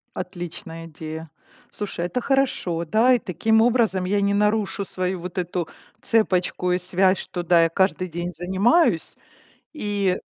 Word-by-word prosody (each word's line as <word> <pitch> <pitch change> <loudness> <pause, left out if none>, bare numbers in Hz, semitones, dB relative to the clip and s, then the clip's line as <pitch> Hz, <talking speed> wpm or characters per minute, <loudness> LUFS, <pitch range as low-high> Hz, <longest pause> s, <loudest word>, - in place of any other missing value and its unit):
Отличная 175 -2 -7
идея. 160 0 -8 0.4
Слушай, 195 -4 -4
это 180 +8 -2
хорошо. 240 -11 0
Да, 225 +9 +4
и 245 - +3
таким 220 +4 +1
образом 225 -6 +2
я 200 +2 +1
не 200 0 +2
нарушу 210 0 +1
свою 185 0 -3
вот 180 +1 -7
эту 175 -1 -2 0.3
цепочку 180 -4 +1
и - - +2
связь, 185 +1 +2
что 175 - -5
да, 170 -1 +5
я 165 - +2
каждый 185 +1 0
день 175 +2 -4
занимаюсь. 190 - +2 0.6
И 205 -8 0
185 Hz, 145 wpm, -23 LUFS, 175-210 Hz, 0.6 s, да